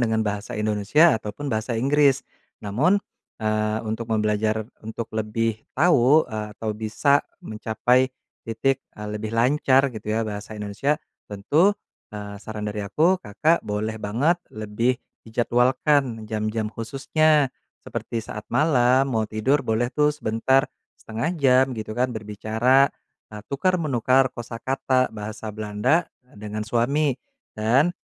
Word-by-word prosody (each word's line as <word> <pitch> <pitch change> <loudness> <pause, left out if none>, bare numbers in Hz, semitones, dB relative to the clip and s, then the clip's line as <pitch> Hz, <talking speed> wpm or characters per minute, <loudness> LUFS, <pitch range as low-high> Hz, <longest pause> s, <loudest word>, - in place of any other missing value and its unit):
dengan 110 -2 +1
bahasa 105 +3 -3
Indonesia 105 +10 +4
ataupun 110 +7 -6
bahasa 110 +2 -1
Inggris. 140 +2 +3 0.4
Namun, 140 - +2 0.4
eee, 110 0 0
untuk 110 +1 -4
membelajar 110 0 0 0.2
untuk 110 +1 -5
lebih 110 0 -1
tahu, 150 -1 +4
eee, 110 -2 -4
atau 110 - -3
bisa 115 +7 +2 0.2
mencapai 120 +4 +1 0.3
titik, 115 +4 0
eee, 105 0 -6
lebih 105 0 -5
lancar 135 +3 +3
gitu 110 -1 -6
ya 110 - +1
bahasa 105 0 -6
Indonesia, 105 +9 -1 0.3
tentu, 145 - +3 0.4
eee, 100 -1 -7
saran 105 -1 -5
dari 105 0 -4
aku 160 - +3
Kakak 150 +10 +1
boleh 105 +1 -2
banget 125 +12 +1 0.2
lebih 110 +4 -1 0.3
dijadwalkan 120 +1 +1
jam-jam 110 0 -2
khususnya. 140 +6 +1 0.3
Seperti 115 - -4
saat 105 -1 -8
malam 130 -3 +3
mau 110 -4 0
tidur 120 +7 +1
boleh 110 +1 +1
tuh 150 0 +3
sebentar, 130 +1 +1 0.3
1/2 115 +10 -3
jam 130 -3 +5
gitu 110 0 -5
kan 125 +1 +2
berbicara, 110 +5 +2 0.4
eee, 105 - -7
tukar 185 +7 +2
menukar 130 -2 +3
kosakata 130 +2 -1
bahasa 110 +1 -6
Belanda 105 +10 +1 0.3
dengan 105 +1 -5
suami. 125 +5 +1 0.4
Dan, 120 +10 +3
115 Hz, 125 wpm, -24 LUFS, 110-135 Hz, 0.4 s, jam